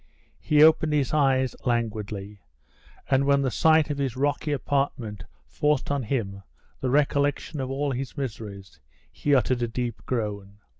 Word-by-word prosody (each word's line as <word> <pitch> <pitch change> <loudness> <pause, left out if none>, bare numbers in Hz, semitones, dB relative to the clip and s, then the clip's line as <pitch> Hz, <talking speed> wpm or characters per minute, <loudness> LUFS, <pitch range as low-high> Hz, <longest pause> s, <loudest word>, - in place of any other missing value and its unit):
He 150 0 +4
opened 160 -1 +5
his 145 -2 +1
eyes 135 -3 +2
languidly, 105 -4 -3 0.7
and 135 +1 +3
when 140 0 +3
the 130 - 0
sight 155 - +3
of 140 - -3
his 130 -3 -2
rocky 145 +2 0
apartment 130 -7 -2 0.2
forced 150 -2 0
on 140 -1 0
him 105 -5 -3 0.4
the 130 - -1
recollection 145 +2 +1
of 130 -1 -3
all 140 +1 -1
his 130 +2 -5
miseries, 105 - -6 0.3
he 145 - +1
uttered 125 -1 +1
a 120 - +1
deep 120 0 -4
groan. 105 -4 -3
130 Hz, 150 wpm, -25 LUFS, 110-145 Hz, 0.7 s, opened